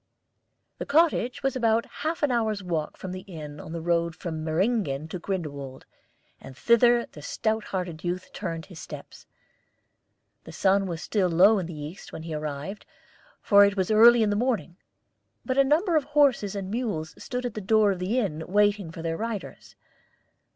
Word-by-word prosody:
The - - -3
cottage 290 -5 +2
was 270 0 0
about 230 -2 +2
half 320 +1 -4
an 290 - +3
hour's 220 -4 0
walk 165 -4 -3
from 185 - -6
the 185 - -5
inn 150 -6 -9
on 155 - -9
the 165 -1 -5
road 170 -1 0
from 160 -3 -5
Meyringen 160 - 0
to 180 - -5
Grindelwald, 145 -8 -5 0.5
and 130 -1 -12
thither 235 - +4
the 150 - -13
stout 220 +8 -2
hearted 180 -4 -4
youth 180 +1 -4
turned 165 -5 -5
his 180 -5 -12
steps. - - -10 1.2
The - - -11
sun 195 0 +2
was 170 -2 -5
still 195 -4 +1
low 195 +6 +5
in 180 - -4
the 165 -3 -8
east 150 +6 -8
when 160 - -7
he 165 -1 -6
arrived, 150 +5 -5 0.6
for 200 -1 +7
it 200 0 +2
was 190 +2 0
early 230 +2 +7
in 210 - +1
the - - +1
morning; 215 - -1 0.7
but 260 +1 0
a - - +7
number 325 +6 +2
of 300 -3 +2
horses 280 -9 +2
and 195 -1 -4
mules 210 -10 -3
stood 250 0 -4
at 245 - -3
the 215 - -5
door 210 +1 +3
of 190 - -3
the 190 +7 -1
inn 160 -10 -1
waiting 205 -2 +2
for 165 0 -8
their 165 0 -2
riders. 225 -3 -6
195 Hz, 185 wpm, -26 LUFS, 165-230 Hz, 1.2 s, for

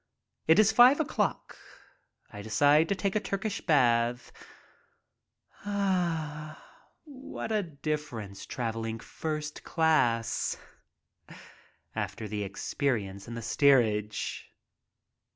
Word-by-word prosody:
It 160 - +6
is 215 0 +6
five 245 +6 +7
o'clock. 315 - -1 0.8
I 105 - -7
decide 145 +9 +3
to 200 - +1
take 195 0 -2
a - - +3
Turkish 200 0 -3
bath^ 120 -5 +2 1.3
Ah, 170 -7 -3
what 270 -6 -7
a 215 -1 +2
difference 145 - -5
traveling 115 -2 -3
first 150 +4 -5
class 120 -9 +1 1.4
after 110 -2 -4
the 105 0 -4
experience 100 -1 -2
in 120 - -6
the 115 - -6
steerage! 110 -5 +2
150 Hz, 95 wpm, -29 LUFS, 115-180 Hz, 1.4 s, five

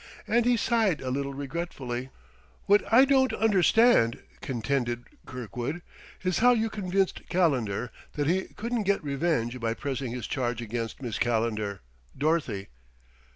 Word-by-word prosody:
And 235 0 +3
he 245 -1 +4
sighed 225 -8 +2
a 130 - -4
little 140 +1 -2
regretfully. 135 -4 -4 0.6
"What 205 +3 +3
I 255 +4 +8
don't 265 -1 +3
understand," 210 - +4 0.2
contended 120 -1 -1 0.2
Kirkwood, 125 - -5 0.4
"is 185 -1 +1
how 245 +2 +6
you 225 -1 0
convinced 195 -2 -1
Calendar 125 - +1 0.2
that 145 - -1
he 185 +5 +1
couldn't 235 +1 -2
get 200 -2 +1
revenge 140 -4 -1
by 115 -1 -1
pressing 135 -3 -3
his 125 -1 -4
charge 120 -3 -2
against 115 +2 -4
Miss 120 -3 -3
Calendar 110 -4 0 0.4
Dorothy." 140 -10 0
140 Hz, 135 wpm, -27 LUFS, 120-195 Hz, 0.6 s, I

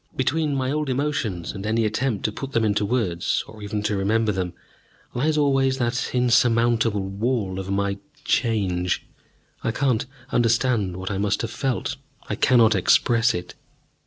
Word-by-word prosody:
Between 145 +2 0
my 130 -1 -1
old 150 -1 -1
emotions 125 - -1
and 95 -1 -7
any 110 +1 +1
attempt 110 +1 -1
to 110 - +1
put 135 +5 -7
them 115 -1 +2
into 105 0 +1
words, 100 -7 0
or 110 -1 -12
even 105 0 -3
to 105 - 0
remember 105 +3 +1
them, 95 -3 -3 0.6
lies 150 +5 +1
always 135 -2 +2
that 120 -1 -1
insurmountable 115 -3 +3
wall 100 -1 -2
of 95 0 -6
my 100 0 -1 0.3
Change. 95 -7 0 0.6
I - - 0
cannot 125 -1 +1 0.3
understand 115 -5 +1
what 95 +2 -4
I 95 - -2
must 100 +2 0
have 115 - -3
felt, 135 +3 -2 0.3
I - - -2
cannot 115 -4 +4
express 115 +5 +3
it. 90 0 -6
115 Hz, 160 wpm, -23 LUFS, 100-125 Hz, 0.6 s, cannot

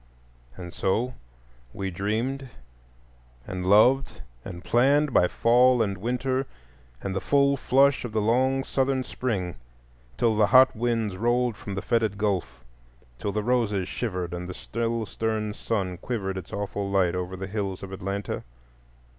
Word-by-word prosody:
And 90 -2 -8
so 120 +7 0 0.6
we 95 -1 -3
dreamed 115 +9 -2 1.0
and 90 -2 -4
loved 125 +7 +4 0.2
and 85 0 -8
planned 140 +7 +3
by 90 - +5
fall 125 +3 +4
and 100 -2 -2
winter, 125 +6 -1 0.6
and 95 -1 -3
the 95 - -1
full 140 0 +3
flush 135 +1 +3
of 120 - -5
the 110 - 0
long 130 +5 +2
Southern 135 -1 0
spring, 100 -10 -3 0.6
till 115 -2 +2
the 105 -1 +4
hot 130 +5 +6
winds 115 -4 -1
rolled 120 +2 +1
from 100 -1 -7
the 100 - -4
fetid 110 -3 +1
Gulf, 95 -12 -2 0.6
till 100 - -2
the 105 +1 -2
roses 105 -6 +1
shivered 90 -8 -3
and 90 +1 -5
the 90 - -6
still 115 0 -2
stern 110 -1 -2
sun 95 -5 -2
quivered 95 -5 -3
its 95 0 -7
awful 100 0 -3
light 95 -3 +2
over 90 +1 -4
the 95 - -4
hills 100 -2 -4
of 95 - -7
Atlanta. 100 +1 -4
110 Hz, 150 wpm, -26 LUFS, 95-125 Hz, 1.0 s, hot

